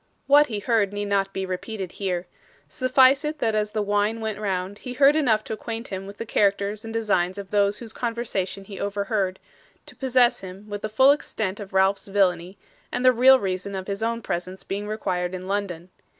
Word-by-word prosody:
What 290 Hz, +1 st, +6 dB
he 215 Hz, -, -4 dB
heard 205 Hz, -2 st, +1 dB
need 205 Hz, 0 st, -3 dB
not 195 Hz, -1 st, +1 dB
be 190 Hz, -1 st, -3 dB
repeated 185 Hz, 0 st, -5 dB
here. 185 Hz, -3 st, -3 dB, 0.4 s
Suffice 260 Hz, +1 st, +4 dB
it 305 Hz, +1 st, -3 dB
that 225 Hz, -6 st, 0 dB
as 210 Hz, -1 st, 0 dB
the 210 Hz, 0 st, -1 dB
wine 205 Hz, +2 st, 0 dB
went 220 Hz, -2 st, -3 dB
round 195 Hz, -1 st, -3 dB
he 250 Hz, -, -6 dB
heard 275 Hz, +3 st, +5 dB
enough 230 Hz, -9 st, +2 dB
to -, -, -5 dB
acquaint 225 Hz, +1 st, -6 dB
him 190 Hz, 0 st, -5 dB
with 200 Hz, +1 st, -10 dB
the 230 Hz, -, -5 dB
characters 200 Hz, 0 st, +1 dB
and 225 Hz, -, -7 dB
designs 200 Hz, -5 st, 0 dB
of 200 Hz, -1 st, -8 dB
those 205 Hz, 0 st, +2 dB
whose 225 Hz, -1 st, -9 dB
conversation 210 Hz, -5 st, -3 dB
he 195 Hz, -1 st, -9 dB
overhead; 200 Hz, -1 st, -1 dB, 0.5 s
to -, -, -14 dB
possess 255 Hz, -2 st, +3 dB
him 190 Hz, +2 st, -10 dB
with 205 Hz, -1 st, -5 dB
the 215 Hz, -, -3 dB
full 260 Hz, +6 st, +6 dB
extent 215 Hz, -8 st, -2 dB
of 200 Hz, -2 st, -8 dB
Ralph's 190 Hz, +1 st, +2 dB
villainy, 185 Hz, -2 st, +1 dB, 0.3 s
and 250 Hz, -, -2 dB
the 255 Hz, -, +7 dB
real 260 Hz, +2 st, +7 dB
reason 195 Hz, 0 st, -3 dB
of 190 Hz, -1 st, -4 dB
his 200 Hz, +1 st, -4 dB
own 230 Hz, 0 st, -1 dB
presence 185 Hz, +2 st, -4 dB
being 205 Hz, +2 st, -4 dB
required 185 Hz, -4 st, -2 dB
in 185 Hz, 0 st, -7 dB
London. 185 Hz, -3 st, -3 dB
205 Hz, 205 wpm, -24 LUFS, 190-225 Hz, 0.5 s, the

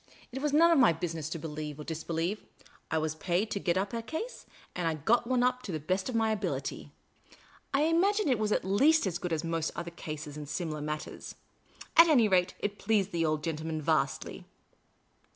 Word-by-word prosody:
It 265 Hz, +2 st, -5 dB
was 295 Hz, 0 st, 0 dB
none 330 Hz, +4 st, +6 dB
of 325 Hz, -, +5 dB
my 235 Hz, -10 st, +6 dB
bnsiness 160 Hz, -2 st, -4 dB
to 165 Hz, -, -4 dB
believe 150 Hz, -2 st, -6 dB
or -, -, -5 dB
disbelieve; 165 Hz, +5 st, -3 dB, 0.5 s
I 160 Hz, -, 0 dB
was 155 Hz, -1 st, 0 dB
paid 180 Hz, +6 st, -1 dB
to 200 Hz, -, -1 dB
get 175 Hz, -2 st, 0 dB
up 195 Hz, +3 st, -1 dB
a 230 Hz, -, -2 dB
case, 320 Hz, -, -6 dB, 0.3 s
and 175 Hz, -2 st, -1 dB
I 160 Hz, -, 0 dB
got 230 Hz, +11 st, +2 dB
one 250 Hz, -1 st, +2 dB
up 250 Hz, 0 st, +1 dB
to 205 Hz, -, -6 dB
the 155 Hz, -, -2 dB
best 185 Hz, -, -1 dB
of 250 Hz, -, -3 dB
my 225 Hz, -1 st, +2 dB
ability. 215 Hz, -1 st, -3 dB, 0.8 s
I 275 Hz, -, +2 dB
imagine 380 Hz, +6 st, +2 dB
it 255 Hz, -5 st, +2 dB
was 215 Hz, -1 st, 0 dB
at -, -, +1 dB
least 280 Hz, +11 st, +4 dB
as 180 Hz, -2 st, -2 dB
good 180 Hz, -, -4 dB
as 160 Hz, 0 st, -1 dB
most 165 Hz, -1 st, -1 dB
other 170 Hz, 0 st, -5 dB
cases 150 Hz, -3 st, -7 dB
in 150 Hz, -1 st, -7 dB
similar 155 Hz, 0 st, -3 dB
matters; 150 Hz, +1 st, -5 dB, 0.6 s
at 335 Hz, +1 st, +9 dB
any 255 Hz, -9 st, +5 dB
rate, 185 Hz, -2 st, +2 dB
it 205 Hz, 0 st, -3 dB
pleased 200 Hz, -2 st, +1 dB
the 165 Hz, -1 st, +1 dB
old 155 Hz, -1 st, -1 dB
gentleman 160 Hz, 0 st, -3 dB
vastly. 155 Hz, -2 st, -1 dB
180 Hz, 205 wpm, -30 LUFS, 160-235 Hz, 0.8 s, at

